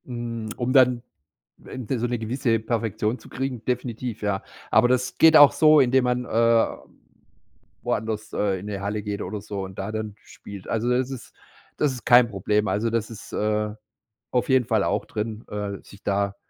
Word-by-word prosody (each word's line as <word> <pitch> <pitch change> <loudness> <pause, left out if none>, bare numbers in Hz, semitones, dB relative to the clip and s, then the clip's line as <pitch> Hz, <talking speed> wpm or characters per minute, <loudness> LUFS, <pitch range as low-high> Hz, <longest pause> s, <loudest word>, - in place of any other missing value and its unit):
Hm, 120 -3 -5
um 125 +1 -1
dann, 125 -3 +4 0.6
ähm, - - -18
irgendwie 130 0 -4
so 120 +1 -1
'ne 120 0 -1
gewisse 115 0 0
Perfektion 110 0 -2
zu - - -15
kriegen, 130 -3 -4
definitiv, 125 -2 -3
ja. 100 -2 -1 0.3
Aber - - +5
das 125 0 0
geht 160 -1 +7
auch 145 -1 +9
so, 155 -1 +5
indem 130 -1 +3
man, 125 0 0
äh, 115 0 +3 1.2
woanders, 110 0 -3
äh, 100 -2 0
in 95 - -9
'ne 100 -2 -4
Halle 105 +1 -3
geht 105 -1 -4
oder 105 -2 -5
so 100 -1 -5
und 95 0 -9
da 100 +2 -3
dann 110 -1 -4
spielt. 100 -2 -11
Also 115 +2 -1
das 125 +1 +1
ist 125 -4 -9 0.4
das 150 -2 +2
ist 125 - -10
kein 120 -1 +6
Problem. 105 +1 0
Also 110 +3 0
das 115 -1 -1
ist, 115 - -11
äh, 105 0 0 0.6
auf 125 +1 0
jeden 130 -2 +4
Fall 110 -3 +1
auch - - -1
drin, 110 0 -5
äh, 100 -1 -4
sich 100 - -16
da 100 0 0
115 Hz, 190 wpm, -24 LUFS, 105-125 Hz, 1.2 s, auch